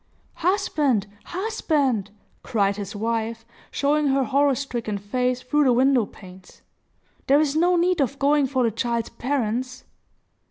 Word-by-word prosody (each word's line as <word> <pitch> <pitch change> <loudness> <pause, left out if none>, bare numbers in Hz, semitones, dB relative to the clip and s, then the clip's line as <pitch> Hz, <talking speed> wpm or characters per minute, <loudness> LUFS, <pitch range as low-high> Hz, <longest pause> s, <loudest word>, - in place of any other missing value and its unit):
"Husband! 300 - +1 0.2
husband!" 300 - -1 0.3
cried 200 -4 0
his 205 0 -6
wife, 225 +1 -2 0.2
showing 295 +1 +1
her 270 0 +2
horror 280 +1 +2
stricken 240 -6 -3
face 250 +5 -1
through 295 +3 +2
the 255 - +4
window 255 -3 +3
panes. 185 -1 -15 0.6
"There 280 +2 +5
is 300 -1 +1
no 350 +3 +3
need 350 -1 +2
of 275 +1 -1
going 285 0 +3
for 260 -1 0
the 230 - +2
child's 235 +1 -2
parents!" 250 -1 -2
255 Hz, 135 wpm, -23 LUFS, 225-290 Hz, 0.6 s, There